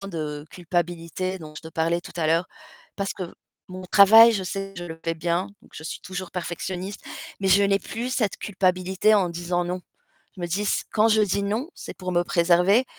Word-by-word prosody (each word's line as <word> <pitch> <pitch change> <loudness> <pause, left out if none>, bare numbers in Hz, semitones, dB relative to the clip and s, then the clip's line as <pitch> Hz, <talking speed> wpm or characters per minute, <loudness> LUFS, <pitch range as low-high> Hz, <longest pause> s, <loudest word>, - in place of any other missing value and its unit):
tant 195 - -7
de 150 -4 -5
culpabilité 175 +1 -3
dont 155 -3 -11
je - - -9
te 160 - -8
parlais 165 +1 0
tout - - -11
à 165 -2 0
l'heure. 165 +3 +2 0.5
Parce 200 -1 -2
que - - -6 0.5
mon 185 0 -8
travail, 220 +5 +8
je 200 -4 -1
sais 195 +1 -5
je 175 - -5
le 165 -1 -8
fais 165 0 0
bien, 170 +3 -1 0.2
donc - - -20
je 155 - -9
suis - - -5
toujours 185 -1 -6
perfectionniste 180 +2 -4 0.4
mais 195 - +1
je 195 +2 +6
n'ai 200 0 +3
plus 235 +5 -5
cette 220 -6 0
culpabilité 190 +1 +2
en 195 -4 +3
disant: 175 +1 -2
«Non». 180 +1 -3 0.6
Je - - -8
me 175 - -2
dis 185 +5 -1
s: 210 - 0
«Quand 220 +1 +4
je 220 0 +4
dis 200 -1 +1
"non", 215 +8 -1
c'est - - -9
pour 185 -1 -4
me 175 0 +3
préserver, 180 +7 +3
185 Hz, 215 wpm, -24 LUFS, 170-200 Hz, 0.6 s, travail